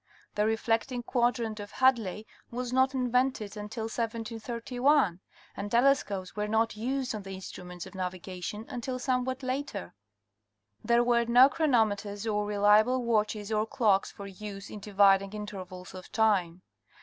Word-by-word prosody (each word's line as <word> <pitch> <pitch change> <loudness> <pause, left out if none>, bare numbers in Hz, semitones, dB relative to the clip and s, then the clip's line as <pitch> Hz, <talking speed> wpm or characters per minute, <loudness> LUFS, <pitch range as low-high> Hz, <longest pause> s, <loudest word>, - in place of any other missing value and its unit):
The 210 +1 +1
reflecting 225 +3 0
quadrant 235 -3 0
of 205 0 -8
Hadley 225 -6 +2 0.2
was 245 +1 -4
not 260 +1 +3
invented 250 -4 0
until 210 +2 -5
1731 230 - 0 0.4
and 200 +1 -4
telescopes 235 -7 +2
were 210 0 -1
not 220 +1 +1
used 260 +3 -2
on 215 - -4
the 195 -1 -7
instruments 180 -2 -8
of - - -12
navigation 185 +2 -5
until 255 -1 -4
somewhat 255 +1 -1
later. 260 - -4 0.9
There 235 +1 +4
were 235 -1 +3
no 245 +3 +7
chronometers 215 -9 +1
or 210 -2 0
reliable 210 +5 +4
watches 215 -2 0
or 215 0 +1
clocks 210 -5 +2
for 200 - -9
use 200 0 -8
in 210 - -7
dividing 195 -1 +3
intervals 185 -3 -7
of 185 -1 -10
time. 190 -6 +1
220 Hz, 135 wpm, -29 LUFS, 200-245 Hz, 0.9 s, no